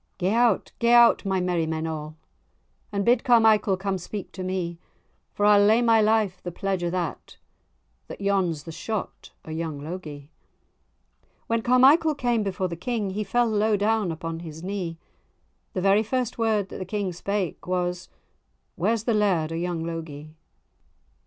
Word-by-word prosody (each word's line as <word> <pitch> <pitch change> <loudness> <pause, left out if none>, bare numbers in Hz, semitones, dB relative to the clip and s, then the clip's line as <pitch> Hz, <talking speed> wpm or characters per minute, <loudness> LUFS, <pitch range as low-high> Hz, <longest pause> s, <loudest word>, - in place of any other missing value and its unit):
"Gae 185 +2 0
out, 235 -3 +2
gae 235 0 +3
out, 235 -2 +6
my 190 -1 0
merrymen 165 -3 -1
a', 155 -1 -5 0.8
And 200 -1 -1
bid 245 0 +3
Carmichael 220 -5 +4
come 190 0 -2
speak 195 +3 -7
to 190 - -8
me; 180 -2 -3 0.6
For 205 - +1
I'll 205 -1 +6
lay 220 +4 +4
my 225 -1 +4
life 215 -4 +1
the 175 - -5
pledge 190 +1 -2
o' 175 - 0
that, 175 -3 -4 0.7
That - - -9
yon's 190 -6 0
the 165 - -8
shot 215 +5 -5 0.2
o' 160 - -8
young 160 -2 -4
Logie." 150 -2 -8 1.1
When 230 0 0
Carmichael 275 +7 +5
came 240 -4 0
before 190 -2 -2
the 170 - -5
King, 210 +2 -3
He 210 +3 -2
fell 240 +5 +1
low 215 -1 +1
down 210 -2 +1
upon 165 0 -5
his 160 -1 -9
knee; 185 -4 -4 0.8
The 185 - -2
very 195 +2 +4
first 245 +1 -2
word 215 -4 +1
that - - -8
the 185 - -4
King 200 -1 -3
spake, 195 0 -3
Was—"Where's 180 +4 -4
the 235 - +1
laird 185 -7 +1
of 165 - -3
young 175 -2 -2
Logie?" 155 -2 -7
195 Hz, 160 wpm, -25 LUFS, 170-220 Hz, 1.1 s, out